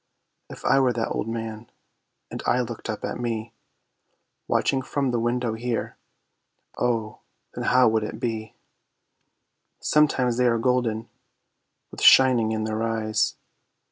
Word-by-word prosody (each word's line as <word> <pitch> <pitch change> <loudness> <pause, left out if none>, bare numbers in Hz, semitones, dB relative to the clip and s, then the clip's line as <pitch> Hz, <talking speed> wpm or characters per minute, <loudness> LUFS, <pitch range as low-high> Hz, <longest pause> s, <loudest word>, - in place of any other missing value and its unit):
If - - -11
I 135 - +4
were 130 -2 +3
that 115 -1 -2
Old - - -2
Man, 115 0 -5 0.6
and - - -5
I 125 - +3
looked 120 -1 -6
up 110 - -3
at - - -4
me 115 -1 -3 0.9
Watching 135 - +1
from 135 0 -1
the 120 - 0
window 120 0 -1
here, 115 0 -3 0.8
Oh, 115 -3 -1 0.3
then - - -5
how 125 -1 +5
would 110 -1 +1
it 105 - -6
be? 110 -2 -4 1.2
Sometimes 130 -5 +2
they 125 0 +3
are 115 -1 +2
golden, 115 -2 0 0.8
with - - -9
shining 125 -4 +6
in 110 -1 -1
their 110 0 -2
eyes. 110 -1 0
115 Hz, 140 wpm, -24 LUFS, 110-125 Hz, 1.2 s, shining